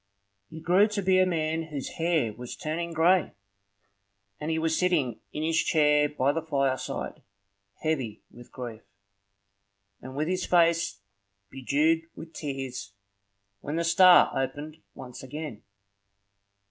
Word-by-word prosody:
He 160 Hz, -, -9 dB
grew 180 Hz, +6 st, +4 dB
to 210 Hz, -2 st, -3 dB
be 185 Hz, 0 st, +4 dB
a 185 Hz, -, +4 dB
man 160 Hz, -1 st, -1 dB
whose 145 Hz, -4 st, -6 dB
hair 160 Hz, -9 st, +1 dB
was 125 Hz, +2 st, -8 dB
turning 170 Hz, +2 st, -4 dB
gray, 170 Hz, +2 st, +3 dB, 1.1 s
and 150 Hz, -, -4 dB
he 160 Hz, -, 0 dB
was 160 Hz, 0 st, 0 dB
sitting 160 Hz, -11 st, +1 dB
in 150 Hz, -, -4 dB
his 165 Hz, +1 st, +1 dB
chair 150 Hz, -1 st, +3 dB
by 140 Hz, -1 st, +1 dB
the 165 Hz, +3 st, -2 dB
fireside, 135 Hz, -4 st, -2 dB, 0.6 s
heavy 135 Hz, -9 st, -2 dB
with 120 Hz, 0 st, -15 dB
grief, 120 Hz, -3 st, -7 dB, 1.2 s
and 130 Hz, +1 st, -9 dB
with 150 Hz, +2 st, -1 dB
his 185 Hz, +1 st, -1 dB
face 170 Hz, -, +2 dB, 0.5 s
bedewed 150 Hz, +5 st, +1 dB
with 160 Hz, 0 st, -10 dB
tears, 135 Hz, -7 st, -5 dB, 0.7 s
when 145 Hz, +8 st, -5 dB
the 170 Hz, -, 0 dB
star 180 Hz, +2 st, +6 dB
opened 145 Hz, +4 st, -4 dB
once 125 Hz, -1 st, -10 dB
again. 145 Hz, -4 st, -7 dB
155 Hz, 135 wpm, -27 LUFS, 135-165 Hz, 1.2 s, star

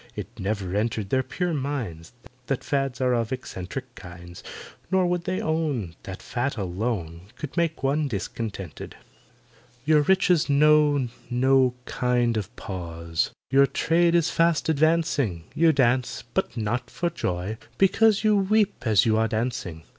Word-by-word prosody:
It 115 Hz, 0 st, -8 dB
never 95 Hz, -2 st, -2 dB
entered 105 Hz, -1 st, -1 dB
their 130 Hz, -, +3 dB
pure 180 Hz, +5 st, -2 dB
minds 130 Hz, -, -4 dB, 0.4 s
That 135 Hz, -, -2 dB
fads 135 Hz, -2 st, -1 dB
are 125 Hz, -1 st, +2 dB
of 115 Hz, -2 st, -1 dB
eccentric 125 Hz, 0 st, -6 dB
kinds, 85 Hz, -2 st, -11 dB, 0.5 s
Nor 190 Hz, -1 st, +3 dB
would 175 Hz, -1 st, -1 dB
they 185 Hz, 0 st, -1 dB
own 150 Hz, -, -1 dB
That 95 Hz, -1 st, -8 dB
fat 125 Hz, +1 st, -2 dB
alone 95 Hz, -3 st, -3 dB
Could 150 Hz, -3 st, -7 dB
make 165 Hz, -4 st, -1 dB
one 145 Hz, +2 st, +1 dB
discontented. 105 Hz, -3 st, -5 dB, 0.9 s
"Your 155 Hz, 0 st, +5 dB
riches 180 Hz, -1 st, +3 dB
know 145 Hz, -2 st, +4 dB, 0.2 s
no 130 Hz, 0 st, +3 dB
kind 120 Hz, -2 st, +1 dB
of 105 Hz, -2 st, -2 dB
pause, 85 Hz, -3 st, -3 dB, 0.2 s
Your 140 Hz, +1 st, +6 dB
trade 170 Hz, +3 st, +2 dB
is 170 Hz, -2 st, +2 dB
fast 165 Hz, -1 st, +2 dB
advancing; 155 Hz, -, +1 dB
You 165 Hz, +1 st, +4 dB
dance—but 120 Hz, -4 st, 0 dB
not 115 Hz, +3 st, -2 dB
for 170 Hz, 0 st, -2 dB
joy, 90 Hz, -, -3 dB, 0.2 s
because 210 Hz, +2 st, +4 dB
You 215 Hz, -1 st, +4 dB
weep 205 Hz, +1 st, +2 dB
as 105 Hz, -3 st, +4 dB
you 110 Hz, -1 st, +3 dB
are 110 Hz, 0 st, +2 dB
dancing. 110 Hz, -8 st, -3 dB
125 Hz, 140 wpm, -25 LUFS, 105-155 Hz, 0.9 s, Your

